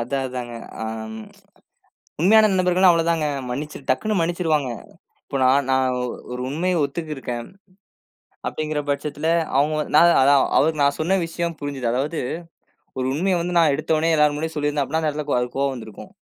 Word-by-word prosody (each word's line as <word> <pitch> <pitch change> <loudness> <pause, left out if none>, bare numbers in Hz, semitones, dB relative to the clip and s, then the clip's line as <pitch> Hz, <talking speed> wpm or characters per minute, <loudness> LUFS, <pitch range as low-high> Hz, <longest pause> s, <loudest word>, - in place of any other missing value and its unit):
அதான் 135 +3 -2
அதாங்க, 125 -2 -6 0.3
அம், 110 0 -5 1.0
உண்மையான 215 +5 +6
நண்பர்கள்னா, 185 0 +4
அவ்ளோதாங்க. 165 -2 +1 0.2
மன்னிச்சுரு 145 +2 -5
டக்குன்னு 215 -2 +1
மன்னிச்சிருவாங்க. 165 -5 0 0.6
இப்ப 135 - -3
நான் 135 +1 +3
நான் 130 -1 +1 0.4
ஒரு 125 - -5
உண்மைய 170 +3 0
ஒத்துக்கிட்டிருக்கேன். 140 -6 -5 1.0
அப்டிங்கிற 155 -1 -3
பட்சத்துல, 145 +2 -2 0.3
அவங்க 150 +2 +2 0.2
நான் 170 +2 +6
அதான் 140 +1 +5 0.2
அவருக்கு 155 0 +2
நான் 140 0 +2
சொன்ன 185 +5 +2
விஷயம் 170 0 -3
புரிஞ்சுது. 140 -5 -3
அதாவது 145 +6 -1 0.8
ஒரு 130 - -1
உண்மைய 180 +4 +1
வந்து 175 +1 -3
நான் 160 -4 +4
எடுத்தவுனே 155 +2 +1
எல்லார் 150 -1 +3
முன்னாடியும் 160 +2 -4
சொல்லி 145 0 0
இருந்தா, 145 -1 0
அப்டின்னா, 160 +4 -2
அந்த 155 - +1
இடத்துல 150 0 -5
அது - - +2
அவருக்கு 125 +2 -4
கோவம் 140 -1 0
வந்து 115 -3 -8
இருக்கும். 105 - -12
150 Hz, 160 wpm, -22 LUFS, 135-165 Hz, 1.0 s, உண்மையான